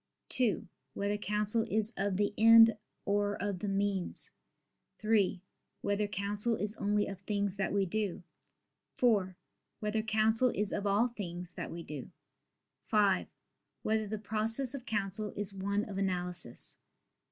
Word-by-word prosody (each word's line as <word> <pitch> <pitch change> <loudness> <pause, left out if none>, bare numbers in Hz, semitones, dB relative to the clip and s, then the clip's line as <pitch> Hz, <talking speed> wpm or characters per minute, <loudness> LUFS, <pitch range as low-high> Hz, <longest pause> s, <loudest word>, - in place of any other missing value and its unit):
(2) 245 -5 +3 0.3
Whether 200 +1 0
counsel 210 +2 0
is 220 +2 0
of 195 -1 -1
the 205 0 +1
end 225 0 +8 0.3
or 205 0 +1
of 200 -1 -2
the 205 - -3
means? 195 -2 -1 0.7
(3) 210 -4 +1 0.4
Whether 205 +1 0
counsel 205 +3 0
is 210 0 -1
only 205 0 +1
of 195 -2 -7
things 200 -1 -1
that 195 -2 -1
we 200 -1 +2
do? 200 -1 -2 0.7
(4) 200 -7 +2 0.4
Whether 215 0 0
counsel 220 +3 +3
is 210 0 -1
of 205 0 -1
all 210 +5 +3
things 180 -6 -6
that - - -6
we 170 0 -6
do? 150 -5 -7 0.8
(5) 205 -3 +3 0.6
Whether 220 0 +1
the 215 +1 -3
process 225 +5 0
of 270 -2 -7
counsel 205 0 -2
is 205 -1 -1
one 200 +2 -1
of 195 -2 -4
analysis? 180 -8 -2
205 Hz, 140 wpm, -32 LUFS, 195-215 Hz, 0.8 s, end